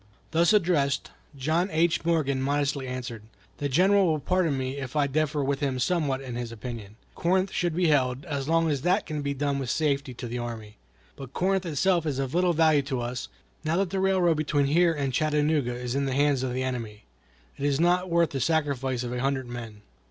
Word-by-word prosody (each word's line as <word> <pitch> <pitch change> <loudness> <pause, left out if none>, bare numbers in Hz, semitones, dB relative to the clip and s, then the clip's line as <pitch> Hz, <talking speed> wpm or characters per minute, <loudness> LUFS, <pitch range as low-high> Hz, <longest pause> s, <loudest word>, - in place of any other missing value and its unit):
Thus 165 +3 +4
addressed, 165 -9 +2 0.3
John 160 +7 0
H. 170 0 +1
Morgan 155 -5 +1
modestly 140 -1 0
answered: 125 -3 -5 0.4
"The 145 - -1
General 190 +7 +4
will 160 -2 +2
pardon 165 -1 +1
me 130 +1 -3
if 130 0 -6
I 150 -1 +3
differ 150 +1 0
with 135 0 -1
him 135 -3 -1
somewhat 140 -1 0
in 130 -2 -7
his 120 -1 -4
opinion. 110 -2 -7 0.2
Corinth 185 +2 +1
should 175 -3 -1
be 175 -2 +2
held, 130 -2 +1
as 140 -1 -3
long 165 0 +3
as 140 -3 -1
that 185 +6 +2
can 155 -2 -4
be 140 0 -2
done 140 0 -1
with 130 -3 -4
safety 140 -4 0
to 120 - -7
the 120 +1 -4
army. 110 -3 -7 0.4
But 135 -1 -10
Corinth 190 0 0
itself 170 +2 +1
is 140 -3 -1
of 135 -1 -2
little 180 0 +3
value 155 -2 +4
to 135 -2 -3
us, 120 - -4 0.4
now 160 +2 0
that 190 -2 0
the 195 - -1
railroad 185 -4 +3
between 145 -2 +1
here 170 +5 +4
and 140 -4 -2
Chattanooga 150 -3 +1
is 125 0 -4
in 140 +1 0
the 135 - -1
hands 145 -2 +2
of 130 -1 -2
the 130 +1 -2
enemy. 115 -5 -4 0.5
It 140 - -3
is 140 -1 +1
not 180 +2 +2
worth 170 -1 +2
the 135 - -3
sacrifice 135 -4 0
of 120 0 -4
a 125 - -3
hundred 135 -1 0
men." 115 -4 -8
140 Hz, 210 wpm, -27 LUFS, 130-165 Hz, 0.5 s, Thus